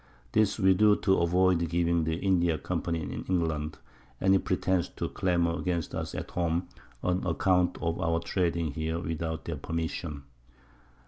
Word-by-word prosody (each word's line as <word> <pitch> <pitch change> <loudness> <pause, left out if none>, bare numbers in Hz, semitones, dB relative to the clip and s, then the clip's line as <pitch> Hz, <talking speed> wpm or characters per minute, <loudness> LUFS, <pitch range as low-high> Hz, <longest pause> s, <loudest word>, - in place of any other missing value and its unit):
This 105 -2 +2
we 95 -3 +5
do 105 +2 +5
to 95 -1 +2
avoid 85 0 +3
giving 85 -1 +1
the 80 0 0
India 85 -3 +2
Company 85 +1 -2
in - - -5
England 80 -4 -1 0.4
any 95 0 +4
Pretence 95 -1 0
to - - -2
clamour 85 -2 0
against 85 -2 -2
us - - -4
at - - -5
home, 85 0 -1 0.3
on 90 +1 0
account 90 +1 +2
of 85 +1 -1
our 85 -1 +1
trading 85 -3 -1
here 80 +2 -2
without 80 -1 -3
their 80 -3 -3
Permission. 80 -1 -4
85 Hz, 150 wpm, -29 LUFS, 80-90 Hz, 0.4 s, we